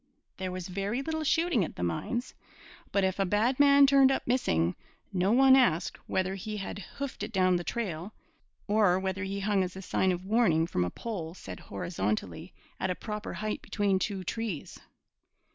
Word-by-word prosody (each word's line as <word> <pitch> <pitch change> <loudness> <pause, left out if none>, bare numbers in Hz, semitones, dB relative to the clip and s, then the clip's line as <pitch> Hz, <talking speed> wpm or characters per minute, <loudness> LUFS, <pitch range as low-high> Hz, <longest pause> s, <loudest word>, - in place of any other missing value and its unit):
There 185 -1 -3
was 185 -1 -5
very 200 +7 -2
little 315 +1 -2
shooting 325 - +2
at - - -5
the 90 - -4
mines, 165 - -2 0.6
but 200 - +2
if 190 +1 0
a - - +4
bad 225 +7 +1
man 280 0 +7
'turned 275 -1 +6
up 270 - -1
missing,' 85 - +1 0.4
no 185 +2 +2
one 265 +2 +7
asked 185 -10 +2
whether 190 0 0
he 210 +2 -5
had 200 0 -5 0.2
'hoofed' 280 -1 -5
it - - -4
down 185 -2 +3
the 175 - -4
trail, 190 -4 -3 0.6
or 205 -4 +4
whether 190 +1 -2
he 200 +1 -3
hung 200 -1 +2
as 185 0 -5
a 190 - -7
sign 190 +1 +1
of 180 +1 -4
warning 190 -7 +3
from 90 - -1
a 90 - -1
pole 175 - -6
set 95 - -9
horizontally 100 - -3 0.3
at 190 - -1
a 180 - 0
proper 210 +1 -5
height 215 0 -3
between 200 -3 0
two 195 -1 -2
trees. 210 -4 -4
195 Hz, 185 wpm, -29 LUFS, 180-230 Hz, 0.6 s, man